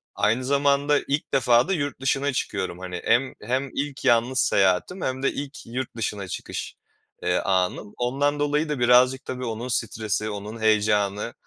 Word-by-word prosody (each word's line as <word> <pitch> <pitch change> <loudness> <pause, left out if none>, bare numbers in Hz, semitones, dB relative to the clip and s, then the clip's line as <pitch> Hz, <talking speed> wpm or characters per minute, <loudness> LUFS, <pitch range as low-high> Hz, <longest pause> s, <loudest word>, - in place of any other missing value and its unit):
aynı 120 +4 +1
zamanda 140 +1 +3
ilk 145 +2 -2
defa 125 -1 +4
da 195 - +1
yurt 145 -6 -3
dışına 135 +1 +1
çıkıyorum 95 -7 -3
hani. 90 -1 -6
Hem 125 +3 +2
hem 130 +5 -1
ilk 140 0 -4
yalnız 120 +2 +3
seyahatim 100 - +2
hem 130 +1 -2
de - - +2
ilk 140 0 -7
yurt 125 +1 -5
dışına 105 -3 -3
çıkış, - - -6 0.5
eee, - - +2
anım. 95 +2 -1
Ondan 140 +4 0
dolayı 150 +2 +1
da 150 -3 -2
birazcık 125 +2 +4
tabii 125 0 -4
onun 115 +1 -4
stresi, 110 -3 -1
onun 105 +2 -6
heyecanı, 105 0 +1
125 Hz, 160 wpm, -24 LUFS, 105-140 Hz, 0.5 s, defa